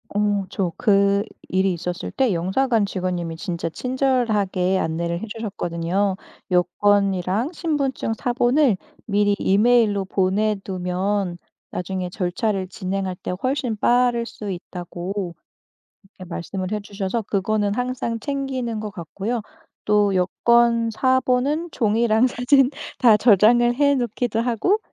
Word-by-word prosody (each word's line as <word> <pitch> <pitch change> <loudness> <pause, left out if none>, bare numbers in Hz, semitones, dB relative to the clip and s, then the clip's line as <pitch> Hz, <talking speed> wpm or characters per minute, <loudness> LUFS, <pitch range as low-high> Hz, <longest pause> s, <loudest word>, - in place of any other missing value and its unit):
어 205 -1 +1
저 190 -3 -1
그 200 -2 +3 0.3
일이 190 0 +2
있었을 175 +1 -4
때 260 -6 +1
영사관 215 +6 +1
직원님이 180 -4 -3
진짜 170 -1 -4
친절하게 215 - 0
안내를 170 +1 -2
해 - - -4
주셨거든요. 195 -3 -2 0.4
여권이랑 195 - +2
신분증 290 -9 -1
사본을 245 +1 +2 0.3
미리 205 -1 +2
이메일로 205 0 +3
보내 195 +3 +1
두면 185 0 -2 0.3
나중에 180 0 -3
절차를 190 +1 -1
진행할 190 -1 -3
때 - - -5
훨씬 255 -3 0
빠를 240 +2 +2
수 210 -3 -7
있다고 180 0 -5 0.7
그렇게 190 -2 -14
말씀을 185 +2 -4
해 210 - -1
주셔서 200 +2 -3
그거는 205 0 0
항상 245 -1 -2
챙기는 260 -3 -3
것 210 0 -5
같고요. 200 +5 -4 0.4
또 210 -1 +3
여권 230 +5 +3
사본은 260 +6 +1
종이랑 225 +1 +2
사진 255 +2 +3 0.3
다 230 -4 +6
저장을 235 +3 +5
해 285 +2 +3
놓기도 240 -2 -1
하고 245 - +1
205 Hz, 270 characters per minute, -22 LUFS, 190-240 Hz, 0.7 s, 다